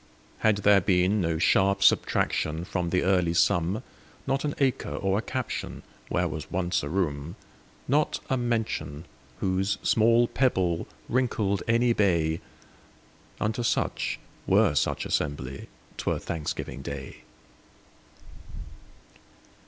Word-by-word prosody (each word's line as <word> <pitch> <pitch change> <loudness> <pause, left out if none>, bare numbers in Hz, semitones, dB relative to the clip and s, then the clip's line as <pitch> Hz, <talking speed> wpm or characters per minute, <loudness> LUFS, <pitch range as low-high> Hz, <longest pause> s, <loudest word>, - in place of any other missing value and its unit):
Had 110 -2 +3
there 100 -1 +6
been 90 +3 +2
no 85 -2 0
sharp 95 +4 +3
subtractionFrom 85 +3 +1
the 90 +2 +1
early 90 -2 +2
sum, 85 +4 +2 0.4
Not 135 +1 0
an 145 -1 -2
acre 135 -3 0
or 95 +1 0
a - - -2
captionWhere 130 0 -4
was - - -6
once 90 0 0
a 70 - -5
room, 80 -3 -2 0.5
Not 145 +4 +1
a 130 - +1
mention, 110 - -2 0.4
whose 95 +1 0
small 115 +2 +4
pebbleWrinkled 105 0 0
any 115 +1 +3
bay,—Unto 95 +4 -3
such, 115 - -1 0.3
were - - +4
such - - 0
assembly,'T 70 -2 -4
were - - +2
Thanksgiving 80 -3 -4
day. 70 -1 -7
95 Hz, 105 wpm, -27 LUFS, 85-115 Hz, 0.5 s, there